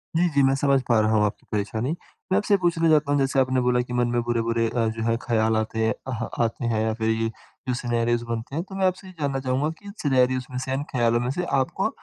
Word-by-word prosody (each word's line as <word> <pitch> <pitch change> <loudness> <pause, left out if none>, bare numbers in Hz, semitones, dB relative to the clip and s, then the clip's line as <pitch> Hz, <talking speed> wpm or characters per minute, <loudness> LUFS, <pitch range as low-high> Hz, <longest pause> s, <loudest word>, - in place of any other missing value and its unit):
जी, 175 +2 +3
जी। 140 -3 +2
मैं 135 0 +4
समझ 135 -1 +2
पा 115 -3 +4
रहा 110 0 +2
हूँ 105 -1 +4
आपकी 105 - -4
परेशानी। 110 +5 -1 0.4
मैं 190 - +4
आपसे 210 0 +1
ये - - +6
पूछना 165 -2 +2
चाहता 150 -2 +3
हूँ, 145 - +3
जैसे 135 0 +1
आपने 130 -1 +2
बोला 125 0 +2
कि 125 0 -6
मन 120 0 +2
में 120 0 0
बुरे-बुरे 115 -1 0
अ, 115 -1 0
जो 110 0 -3
है 115 0 +2
ख़्याल 110 -2 +1
आते 110 0 -2
हैं 110 - +2
अह 125 -4 -3 0.2
आते 115 +2 -2
हैं 115 -2 +1
या 110 0 0
फ़िर 110 0 -1
ये 115 0 +1 0.4
जो 125 - +1
सिनेरियोस 120 -1 0
बनते 115 +4 -4
हैं। 165 - -1
तो 195 - -7
मैं 190 0 +1
आपसे 185 +1 -3
ये 185 - -11
जानना 140 -2 -1
चाहूँगा 130 +3 0
कि 205 0 -10
सिनेरियोस 130 -2 +2
में 125 - -4
से, 130 +1 -3
इन 135 +2 -1
ख़्यालों 120 -2 +2
में 120 +1 -1
से 180 +6 -2 0.2
आपको 130 - 0
125 Hz, 265 wpm, -24 LUFS, 115-140 Hz, 0.4 s, ये